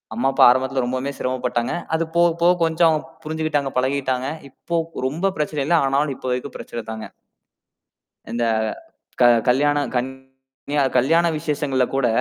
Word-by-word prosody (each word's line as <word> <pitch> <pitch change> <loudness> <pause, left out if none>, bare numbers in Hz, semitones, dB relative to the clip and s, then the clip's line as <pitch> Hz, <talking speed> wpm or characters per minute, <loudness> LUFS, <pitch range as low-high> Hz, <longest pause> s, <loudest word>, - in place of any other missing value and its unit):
அம்மா, 130 +3 +1
அப்பா - - +5
ஆரம்பத்துல 130 0 0
ரொம்பவும் 130 +2 -3
சிரமப்பட்டாங்க. 125 -2 -1 0.2
அது 165 - +1
போகப் 170 -1 +3
போக, 175 +1 +6
கொஞ்சம் 160 -1 +3 0.3
புரிஞ்சுக்கிட்டாங்க. 155 -3 -1
பழகிட்டாங்க. 130 0 -1 0.2
இப்போ 170 +5 -5 0.3
ரொம்ப 180 +7 -1
பிரச்சனை 150 -1 -1
இல்ல. 175 - +3
ஆனாலும் 140 0 0
இப்போதைக்கு 125 +2 -4
பிரச்சனைதாங்க. 110 -1 -7 1.2
இந்த 120 0 -1 0.8
க - - +7 0.2
கல்யாணம் 145 +3 +2
கல்யா 130 +2 -4 0.2
கல்யாண 165 +7 +3
விசேஷங்கள்ல 145 -4 0
கூட, 130 -3 +2
135 Hz, 125 wpm, -21 LUFS, 130-150 Hz, 1.2 s, க